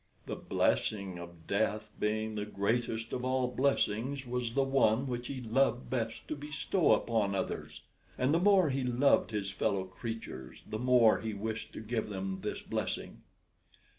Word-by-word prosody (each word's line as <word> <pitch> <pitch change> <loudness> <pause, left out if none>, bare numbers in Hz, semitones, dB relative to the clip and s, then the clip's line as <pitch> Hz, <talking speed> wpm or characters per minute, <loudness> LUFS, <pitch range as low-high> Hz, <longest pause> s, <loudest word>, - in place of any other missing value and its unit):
The - - -4
blessing 100 -4 0
of 85 -1 -11
death, 105 +1 0
being 110 +1 0
the 105 -1 -3
greatest 115 +2 -1
of 125 - -2
all 130 0 +1
blessings, 130 0 0
was 120 -1 -2
the 135 - +4
one 135 -2 +3
which 120 -2 -3
he 135 -2 -5
loved 120 0 +1
best 115 -3 -2
to - - -1
bestow 150 +4 +1
upon 105 -4 +1
others; 95 - -3 0.4
and 130 +3 +2
the 165 - +4
more 190 -5 +5
he 135 0 0
loved 125 +3 +3
his 105 -3 -2
fellow 95 -1 0
creatures 95 - -7
the 110 - -4
more 125 -2 +5
he 110 -1 -4
wished 110 +2 -4
to - - -6
give 110 0 -2
them 95 -1 -3
this - - -4
blessing. - - -3
115 Hz, 165 wpm, -32 LUFS, 105-130 Hz, 0.4 s, more